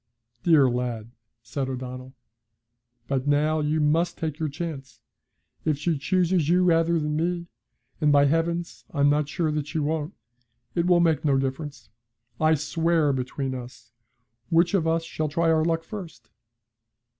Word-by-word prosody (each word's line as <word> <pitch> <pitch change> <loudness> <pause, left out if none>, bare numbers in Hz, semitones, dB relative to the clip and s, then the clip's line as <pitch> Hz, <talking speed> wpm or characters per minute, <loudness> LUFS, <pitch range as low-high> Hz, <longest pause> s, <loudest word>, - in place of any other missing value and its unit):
'Dear 155 -6 +5
lad!' 120 -2 -3 0.3
said 135 -2 -3
O'Donnell. 130 0 -7 0.9
'But 135 0 -1
now 150 +2 +2
you 155 +1 0
must 165 +3 +1
take 155 -2 -4
your 155 -1 -1
chance. 140 -4 -6 0.6
If 155 -2 +1
she 165 +3 0
chooses 175 0 +1
you 180 +1 +4
rather 170 -1 +3
than 150 0 -2
me 170 +2 -1 0.6
and, 150 -1 +4
by 145 0 +5
heavens! 170 +3 -1
I'm 145 0 +3
not 150 0 +1
sure 160 0 -1
that 150 -1 -2
she 150 - -4
won't 155 +2 -2 0.6
it 170 0 0
will 175 -1 +5
make 160 -3 +2
no 140 -3 +3
difference, 135 0 -4 0.5
I 155 0 +4
swear, 160 0 +1
between 130 +1 -3
us. 125 -2 -9 0.6
Which 170 +3 +3
of 175 -5 +2
us 165 0 +1
shall 155 -2 -3
try 165 +2 +2
our 160 -1 +3
luck 165 0 0
first?' 165 - -9
155 Hz, 155 wpm, -25 LUFS, 140-165 Hz, 0.9 s, Dear